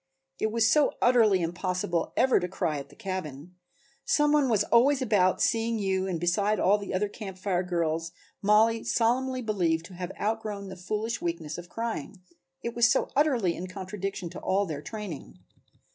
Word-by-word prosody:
It 220 - 0
was 230 0 +3
so 295 +5 +4
utterly 220 -7 +4
impossible 175 0 -2
ever 260 -4 +4
to 180 - -2
cry 170 -5 -2
at 140 - -9
the - - -17
cabin. 180 -6 -6 0.5
Some 295 +2 +2
one 295 -3 +3
was 210 -3 +3
always 260 +6 +4
about 205 -8 +2
seeing 230 0 +1
you 190 -2 0
and 175 -3 -2
besides 200 +5 +1
all 205 +2 +3
the 200 - -6
other 190 +3 0
Camp 200 -2 -8
Fire 185 -1 0
girls 165 -2 -1 0.3
Mollie 220 +2 +4
solemnly 255 +2 +1
believed 170 -7 0
to 185 - -12
have 180 0 -5
outgrown 210 -2 -3
the 190 - -7
foolish 215 +6 -3
weakness 165 -2 -3
of 175 0 -11
crying, 220 -5 -4 0.4
it 235 - -3
was 235 0 +5
so - - +1
utterly 255 - +2
in 185 - -6
contradiction 190 -1 -5
to - - -7
all 195 +2 +1
their 155 -5 -5
training. 180 - -7
195 Hz, 175 wpm, -28 LUFS, 175-225 Hz, 0.5 s, was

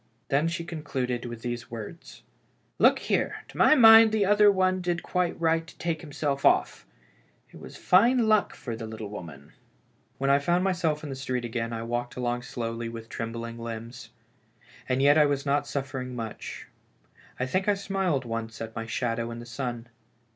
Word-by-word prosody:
Then 145 +4 +2
she 170 0 -3
concluded 130 -7 -3
with 120 -1 -7
these 120 -1 -4
words: 115 +9 -9 0.6
"Look - - +6
here, - - -1
to - - -14
my - - +6
mind 225 -3 +9
the 215 -2 +2
other 205 +1 +6
one 185 -1 +1
did 175 -1 -2
quite 180 -1 -1
right 165 0 +1
to - - -15
take 165 -2 -2
himself 145 -3 -3
oT. - - +2 0.7
It - - -13
was - - -11
fine 230 +5 +4
luck 215 -1 +2
for 115 -3 -6
the 115 0 -7
little 110 -2 -7
woman! 80 -8 -10 0.3
" - - -39
When 135 +1 +1
I 140 - +5
found 175 +5 +1
myself 170 -5 0
in 145 - -5
the - - -4
street 130 -2 -3
again, 115 0 -3
I 115 0 -4
walked 120 +1 -3
along 120 -1 -2
slowly 115 -2 -4
with 115 0 -9
trembling 115 +1 -5
limbs. 115 +1 -7 0.8
And 130 +1 +1
yet 145 +2 +6
I 150 - +6
was 140 -1 -1
not 140 0 +1
suffering 130 -2 -4
much; 115 -3 -7 0.7
I 130 - 0
think 185 +9 -1
I 205 - +4
smiled 190 -8 -1
once 115 -1 -5
at 110 0 -7
my 115 0 -4
shadow 115 0 -2
in 115 - -6
the 120 - -8
sun. 120 0 -5
130 Hz, 185 wpm, -27 LUFS, 115-170 Hz, 0.8 s, mind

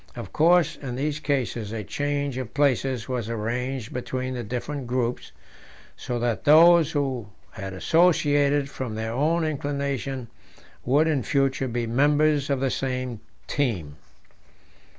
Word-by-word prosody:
Of - - -8
course 170 +2 +4
in 125 -4 -6
these 145 +3 -2
cases 125 -8 -2
a 110 -1 -4
change 145 +3 -2
of 125 -4 -7
places 135 -4 +1
was 125 -4 -3
arranged 120 +2 -3
between 130 +1 -3
the 125 - -3
different 125 +4 -4
groups, 125 -1 -2 0.6
so 120 - -4
that 120 -2 -1
those 160 +1 +6
who 135 -7 -1 0.2
had 95 0 -7
associated 145 - +3
from 130 -5 -5
their 110 0 -3
own 160 +6 +1
inclination 140 -4 -3 0.6
would 145 +5 +3
in 155 -4 +1
future 135 0 0
be 120 -1 -2
members 145 +4 +2
of 140 -2 0
the 135 -1 +1
same 130 -3 -3 0.3
team. 90 - -2
135 Hz, 135 wpm, -25 LUFS, 120-145 Hz, 0.6 s, those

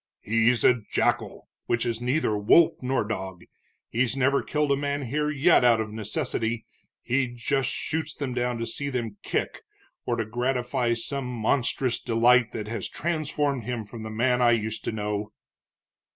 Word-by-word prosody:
"He's 115 +2 +2
a 125 -2 +4
jackal, - - 0 0.2
which 120 -1 +1
is 115 -1 -2
neither 125 -2 +1
wolf 105 +11 +4
nor 130 -1 0
dog. 95 -4 -5 0.4
He's 130 +2 0
never 135 +1 +3
killed 150 -1 0
a - - +5
man 140 0 -2
here 150 +4 -1
yet 150 +1 +4
out 120 -2 +5
of 110 -1 -3
necessity 110 +1 -2 0.4
he 130 +2 +1
just 125 +2 -1
shoots 155 +1 -3
them 135 -3 -3
down 125 -1 -1
to 115 - -3
see 140 +4 -2
them 115 -6 -3
kick, - - -2 0.5
or 120 - +1
to 115 - -2
gratify 120 +1 0
some 135 +3 -2
monstrous 125 +1 0
delight 120 +1 +3
that 105 -1 -5
has 115 +2 -4
transformed 145 -6 -1
him 120 -3 -3
from 110 +2 -9
the 110 - -6
man 125 +3 +1
I 120 -1 +5
used 110 -1 -2
to - - -1
know." 105 0 -3
120 Hz, 165 wpm, -26 LUFS, 115-135 Hz, 0.5 s, a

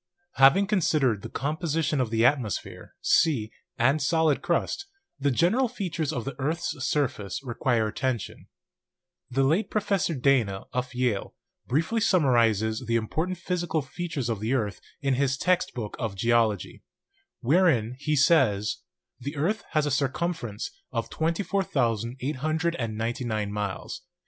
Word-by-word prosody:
Having 140 +9 +6
considered 150 - +2
the - - -7
composition 155 0 -1
of 125 - -1
the 115 +1 +2
atmosphere, 125 -8 -1
sea, 130 -10 +3 0.3
and 135 +6 +3
solid 160 0 +2
crust, 200 - -1 0.3
the 140 +1 +2
general 180 - +3
features 165 - -3
of 125 -7 -3
the 135 -2 -4
earths 155 +5 -1
surface 135 -7 -1
require 120 -3 0
attention. 120 -1 -3 0.8
The 135 +2 +1
late 160 +11 +2
Professor 200 -5 0
Dana, 125 -8 +2
of 125 +1 -3
Yale, 125 -5 -1 0.3
briefly 165 - +1
summarizes 120 - +2
the 115 - +1
important 160 +11 -1
physical 175 -3 -1
features 150 -3 -4
of 115 -4 -2
the 110 +5 0
earth 105 -7 -2 0.2
in 135 -1 +2
his 135 +1 +1
'Text 180 +2 +1
Book 110 -4 -4
of 110 -5 -3
Geology/ 115 -1 +1 0.6
wherein 130 - +3
he 150 +2 0
says: 130 -9 +3 0.4
"The 140 +5 -5
earth 185 +10 0
has 155 -1 +2
a 145 - -1
circumference 135 -5 -2 0.2
of 115 -3 -3
24,899 130 - -1
miles. 105 - -4
135 Hz, 130 wpm, -27 LUFS, 115-165 Hz, 0.8 s, Having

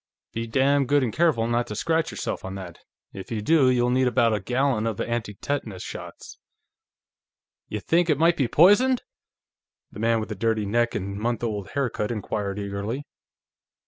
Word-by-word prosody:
"Be 115 +1 -3
damn 135 +3 +2
good 145 0 +3
and 115 -4 -2
careful 160 -9 +2
not 120 +1 0
to 105 - -5
scratch 165 +7 0
yourself - - -4
on 95 0 -6
that; 95 -3 -8 0.3
if 95 - -8
you 110 - -1
do, 135 +4 +4
you'll 125 -1 +2
need 130 0 +3
about 115 -2 +3
a 105 - 0
gallon 125 +1 0
of 110 -3 -3
anti 115 -4 -3
tetanus 110 -6 -4
shots." - - -9 1.3
"Y'think 165 - 0
it 150 - +3
might 165 +2 +4
be 135 -7 +1
poisoned?" 205 - +5 0.9
the - - -10
man 115 +1 +2
with 110 - -5
the - - -3
dirty 110 +1 0
neck 120 +3 +1
and 100 0 -3
the - - -7
month 120 0 -1
old 105 -4 -2
haircut 125 -6 -1
inquired 105 -3 -3
eagerly. 100 +6 -4
115 Hz, 175 wpm, -25 LUFS, 105-140 Hz, 1.3 s, poisoned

